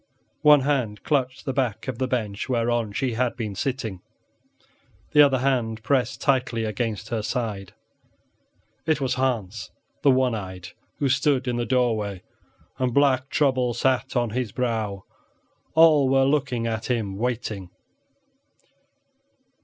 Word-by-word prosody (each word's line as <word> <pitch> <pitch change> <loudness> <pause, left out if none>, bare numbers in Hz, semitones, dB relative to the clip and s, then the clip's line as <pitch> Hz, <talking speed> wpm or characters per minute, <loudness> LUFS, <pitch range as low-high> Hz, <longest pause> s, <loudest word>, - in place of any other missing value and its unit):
One 150 -1 +7
hand 125 -8 -1
clutched 130 -3 -1
the 135 - -2
back 130 -5 -1
of 125 -3 -4
the 130 - 0
bench 110 -3 -3
whereon 120 -3 0
she 125 +4 -1
had 120 +2 0
been 110 -4 -3
sitting, 110 -5 -3 1.1
the 150 - +7
other 140 -2 +5
hand 120 -4 0
pressed 130 +1 0
tightly 130 -4 +1
against 110 0 -3
her 115 -2 -1
side. 105 -5 -4 1.1
It 155 -1 +2
was 130 -2 0
Hans 115 -6 -2 0.3
the 140 - +4
one 130 -2 +3
eyed 95 -4 -6 0.3
who 140 - 0
stood 135 -1 +1
in 120 -1 0
the 120 -1 -2
doorway, 110 -7 0 0.6
and 125 -2 0
black 135 -2 +3
trouble 130 -5 +1
sat 130 +2 0
on 120 -3 +1
his 120 -2 -2
brow; 110 -6 -2 0.7
all 155 -4 +6
were 135 0 +4
looking 130 -4 0
at 115 0 -3
him 110 -6 -1
waiting. 110 -6 -3
125 Hz, 135 wpm, -24 LUFS, 110-130 Hz, 1.1 s, One